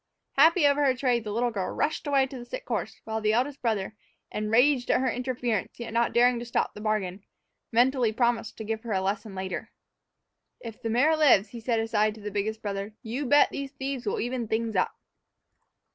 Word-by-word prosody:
Happy 320 +3 +5
over 285 0 +4
her 265 -2 +3
trade, 245 -3 +1
the 210 - -5
little 240 +3 0
girl 195 -4 -2
rushed 310 0 -1
away 275 -2 +3
to 265 -1 -8
the - - -7
sick - - -7
horse, - - -3
while 220 0 -3
the 215 0 +2
eldest 265 +4 0
brother, 215 -3 -1 0.4
enraged 245 +5 +2
at - - +4
her 260 -1 +1
interference 245 -5 -2
yet 235 -1 -6
not 235 0 +2
daring 245 0 +4
to - - -5
stop 235 - -1
the 210 - -10
bargain, 205 -3 -2 0.5
mentally 245 0 +3
promised 235 0 0
to 220 - -5
give 220 0 -3
her 230 -2 -4
a 190 - +2
lesson 200 +1 -3
later. 190 +3 -4 0.9
"If 225 -2 -9
the 225 - -2
mare 265 +8 +3
lives," 265 -10 +5
he 235 - -8
said 230 0 0
aside 215 -1 +1
to 220 - -12
the 210 0 -5
biggest 215 +2 -2
brother, 200 +1 -4
"you 250 +5 -3
bet 290 +3 +5
these 280 0 -5
thieves'll 275 - -3
even 245 -1 -2
things 220 0 -1
up." 185 - +1
235 Hz, 205 wpm, -27 LUFS, 215-260 Hz, 0.9 s, Happy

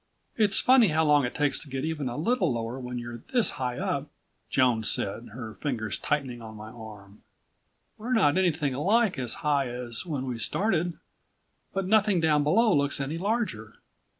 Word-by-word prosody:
"It's 210 -3 +3
funny 255 -3 +6
how 160 -1 +2
long 145 -2 +4
it 120 - -5
takes 145 -2 +1
to 145 - -10
get 135 +2 -3
even 150 -5 -2
a 120 - -5
little 180 - +1
lower 115 +2 -3
when 125 -1 -5
you're 120 0 -7
this 245 -5 +3
high 125 -1 -2
up," 140 +1 -2 0.4
Joan 125 -4 +2
said, 110 +2 -1
her 115 -2 -7
fingers 110 -7 -3
tightening 130 -5 -2
on 110 -1 -9
my 110 +1 -9
arm. 105 -4 -12 0.8
"We're 240 +4 -2
not 160 -11 +4
anything 165 -7 +1
like 195 - +2
as 125 -3 -2
high 140 -3 +2
as 120 -1 -2
when 145 -7 -4
we 125 -3 -4
started. 175 - 0 0.7
But 195 -1 -2
nothing 210 -1 +3
down 150 -2 +3
below 215 +8 +3
looks 140 0 +1
any 145 +4 -3
larger." 195 - -2
145 Hz, 180 wpm, -27 LUFS, 120-180 Hz, 0.8 s, funny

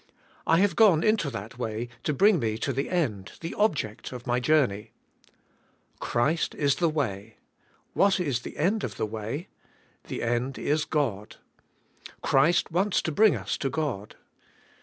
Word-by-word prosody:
I 165 - +5
have 200 +2 +2
gone 190 -8 +5
into 215 -9 +2
that 115 0 -8
way 115 0 -3 0.2
to - - +1
bring 195 +5 +4
me 110 -3 -1
to 135 +4 -2
the 135 +3 -2
end, 110 - -1
the 165 - -5
object 150 - -1
of 125 -1 -8
my 120 0 +1
jour 150 +2 +4
ney. 105 +1 -8 1.1
Christ 140 +8 0
is 140 -2 +1
the 170 -2 +2
way; 110 -8 -3 0.6
what 195 -1 +3
is 140 -9 0
the - - -9
end 200 +7 +1
of 105 -6 -4
the - - 0
way? 110 - -5 0.6
The - - -5
end 120 +2 -1
is 150 +6 0
God. 115 -9 -2 0.9
Christ 160 +7 +3
wants 190 +4 +1
to 160 - -1
bring 215 +6 +4
us - - -3
to 135 - -2
God. 135 -8 -3
140 Hz, 160 wpm, -27 LUFS, 115-165 Hz, 1.1 s, I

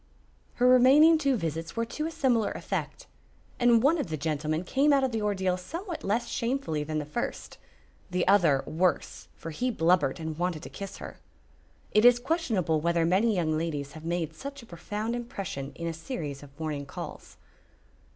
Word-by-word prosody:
Her 250 - +3
remaining 275 +6 +7
two 280 -3 +2
visits 165 -2 -4
were 230 0 0
to 305 +7 -3
a - - -5
similar 255 -9 +1
effect, - - -4 0.5
and 240 -1 +5
one 315 +4 +4
of - - -2
the 160 -1 -3
gentlemen 155 +2 -1
came 275 +9 +2
out 275 -1 +4
of 260 - +1
the 225 -2 -2
ordeal 190 -3 0
somewhat 335 - -6
less 230 +5 0
shamefully 230 - -1
than 155 +1 -3
the 150 - -2
first, 150 - -5 0.5
the 180 0 0
other 170 -9 +4
worse, 175 +2 -1
for 165 - -7
he 250 +11 -1
blubbered 165 - +2
and 160 -1 -5
wanted 175 -3 -1
to - - -7
kiss 195 -1 -7
her. - - -9 0.7
It 215 - +4
is 245 0 +8
questionable 230 - 0
whether 170 0 +2
many 200 +6 +3
young 160 -3 +1
ladies 150 -3 -3
have 155 +1 -11
made 165 -1 -2
such 280 -1 -8
a - - -12
profound 210 +5 -4
impression 195 - -5
in 170 - -6
a 165 - -2
series 160 - -5
of 140 +1 -15
morning 150 -3 -3
calls. - - -8
185 Hz, 180 wpm, -28 LUFS, 160-245 Hz, 0.7 s, is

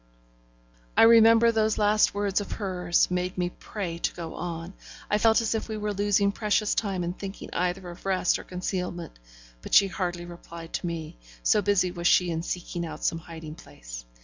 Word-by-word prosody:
I - - +8
remember 230 0 +7
those 220 -1 +1
last 210 0 +3
words 205 0 0
of 205 - -6
hers 180 -4 0
made 180 +1 -2
me 180 0 -1
pray 175 -5 -6
to - - -1
go 165 -2 -6
on; 170 +1 -5 0.4
I 210 - +3
felt 225 +1 +4
as 225 - 0
if 225 0 -3
we 220 - -3
were 210 0 -2
losing 200 0 +2
precious 210 0 +1
time 195 -4 -1
in 175 +1 -2
thinking 195 +1 -8
either 180 +1 -1
of 175 0 -10
rest 185 -2 +2
or - - -8
concealment; 180 - -4 0.4
but - - -1
she 200 -1 +7
hardly 175 -2 -3
replied 170 -1 -10
to - - -2
me, 165 - -5 0.3
so 210 - +4
busy 200 -3 +2
was 170 0 -1
she 180 -1 +4
in 165 0 -2
seeking 175 0 -4
out 160 -2 -7
some 165 - 0
hiding 160 -2 -9
place. - - -10
180 Hz, 190 wpm, -27 LUFS, 170-205 Hz, 0.4 s, I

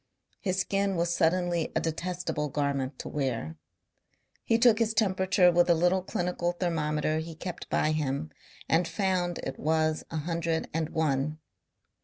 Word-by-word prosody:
His 190 -2 -1
skin 195 0 0
was 170 0 +1
suddenly 170 0 +1
a - - +3
detestable 165 -2 -2
garment 140 -2 -1
to - - -7
wear. 120 - -2 0.9
He 225 - +3
took 230 -2 +5
his 225 -1 +1
temperature 190 -3 +3
with 175 +1 +3
a 170 - +6
little 180 +3 +2
clinical 175 -1 -1
thermometer 155 -3 0
he 160 0 -6
kept 175 +2 -7
by 155 - +2
him 150 0 -2 0.4
and 165 +1 +2
found 185 -3 0
it 135 - -5
was 155 0 +1
a 160 - -4
hundred 165 +1 -1
and 160 -1 -1
one. 150 -1 0
165 Hz, 150 wpm, -28 LUFS, 155-180 Hz, 0.9 s, a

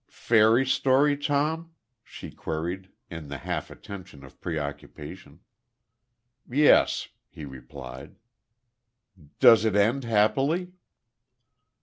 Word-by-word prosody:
"Fairy 115 +3 +3
story, 135 +2 +3
Tom?" 155 +3 -2 0.3
she - - -10
queried, 90 +4 -5 0.2
in 80 -3 -7
the 70 0 -6
half - - -4
attention 95 -8 -11
of 65 - -18
preoccupation. 75 -4 -7 1.1
"Yes," 145 +4 +4 0.2
he 75 - -10
replied. 65 0 -10 1.2
"Does 115 -4 +7
it 110 -3 +1
end 115 +7 +2
happily?" 135 - +1
110 Hz, 90 wpm, -26 LUFS, -, 1.2 s, Does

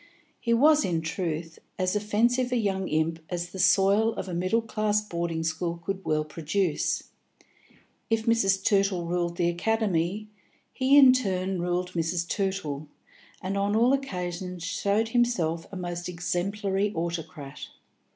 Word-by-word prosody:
He 235 - -2
was, 300 +6 +5
in 170 -3 0
truth, 165 -1 -4 0.2
as 185 +1 0
offensive 235 +5 +1
a - - +1
young 195 -4 -1
imp 160 +1 0
as 175 0 -4
the 190 - -7
soil 200 +4 +4
of 190 -1 -5
a 180 - -5
middle 185 +7 +1
class 215 -1 0
boarding 170 -5 -3
school 170 +1 -2
could 195 0 -3
well 155 0 0
produce. 160 +2 -1 1.0
If 225 0 +1
Mrs. 195 -5 +2
Tootle 195 -4 +2
ruled 170 0 -1
the 170 - +2
Academy, 195 +1 0 0.5
he 265 +2 +4
in 265 -3 +9
turn 190 -6 -1
ruled 180 +1 -1
Mrs. 170 0 -1
Tootle, 170 -7 -2 0.6
and 190 +2 -2
on 200 +1 +1
all 240 +4 +4
occasions 180 -8 -3
showed 200 +4 0
himself 185 -10 +1
a - - -7
most 175 -1 -4
exemplary 195 +3 -1
autocrat. 165 -4 -5
185 Hz, 140 wpm, -27 LUFS, 170-210 Hz, 1.0 s, in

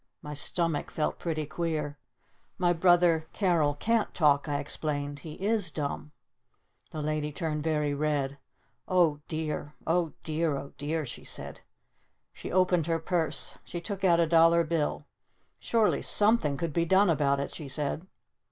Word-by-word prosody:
My 150 - -6
stomach 165 +1 0
felt 155 - -2
pretty 155 -3 -2
queer. 150 -2 -3 0.6
"My 175 -2 +3
brother 170 -2 +4
Carol 165 -7 +2
can't 225 +8 +1
talk," 150 -2 +3
I 145 - 0
explained. 145 0 -3
"He 155 +1 -8
is 205 -1 0
dumb!" 150 0 -4 0.8
The 155 - -5
Lady 150 0 -1
turned 150 0 -2
very 150 -2 0
red. 145 -2 -1 0.5
"Oh 170 -5 +3
dear 155 -1 -4
Oh 165 -1 +1
dear 155 -2 0
Oh 140 0 -8
dear," 155 +2 -1
she 120 - -8
said. - - -6 0.7
She - - -7
opened 180 -3 +3
her 165 -1 +1
purse. 165 0 -1
She 175 - -6
took 195 +3 -6
out 170 -3 +5
a 170 - +4
dollar 165 +1 +5
bill. 160 -2 -1 0.5
"Surely 225 -2 +2
something 205 -10 +2
could 165 0 -3
be 170 - +2
done 190 +2 +4
about 140 -2 +2
it!" 140 - -4
she 150 -4 -7
said. 150 +5 -2
160 Hz, 150 wpm, -29 LUFS, 150-175 Hz, 0.8 s, out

